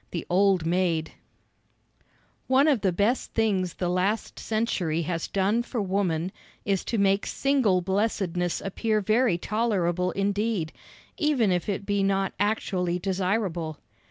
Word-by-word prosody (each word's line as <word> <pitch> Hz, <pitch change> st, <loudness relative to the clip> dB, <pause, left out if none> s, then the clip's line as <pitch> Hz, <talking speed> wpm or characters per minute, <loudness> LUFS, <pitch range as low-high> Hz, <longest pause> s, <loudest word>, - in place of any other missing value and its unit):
The 170 Hz, -, -4 dB
Old 190 Hz, -2 st, +3 dB
Maid 170 Hz, -2 st, 0 dB, 1.4 s
One 265 Hz, +3 st, +4 dB
of 275 Hz, -8 st, +3 dB
the 190 Hz, -, +2 dB
best 205 Hz, +8 st, 0 dB
things 195 Hz, -6 st, +1 dB
the 180 Hz, -, -2 dB
last 185 Hz, +5 st, -1 dB
century 180 Hz, -7 st, -1 dB
has 165 Hz, 0 st, -3 dB
done 200 Hz, +4 st, +1 dB
for 240 Hz, 0 st, -4 dB
woman 185 Hz, -3 st, 0 dB, 0.3 s
is 195 Hz, -2 st, 0 dB
to 230 Hz, -, -1 dB
make 195 Hz, 0 st, +2 dB
single 255 Hz, -10 st, +2 dB
blessedness 190 Hz, -2 st, -1 dB
appear 215 Hz, +3 st, 0 dB
very 215 Hz, -1 st, +2 dB
tolerable 180 Hz, -4 st, 0 dB
indeed, 200 Hz, -3 st, -1 dB, 0.5 s
even 285 Hz, -, +2 dB
if 180 Hz, +2 st, -1 dB
it 200 Hz, 0 st, -2 dB
be 200 Hz, -1 st, 0 dB
not 195 Hz, -1 st, +1 dB
actually 190 Hz, -4 st, 0 dB
desirable. 185 Hz, -4 st, -1 dB
195 Hz, 130 wpm, -26 LUFS, 180-215 Hz, 1.4 s, One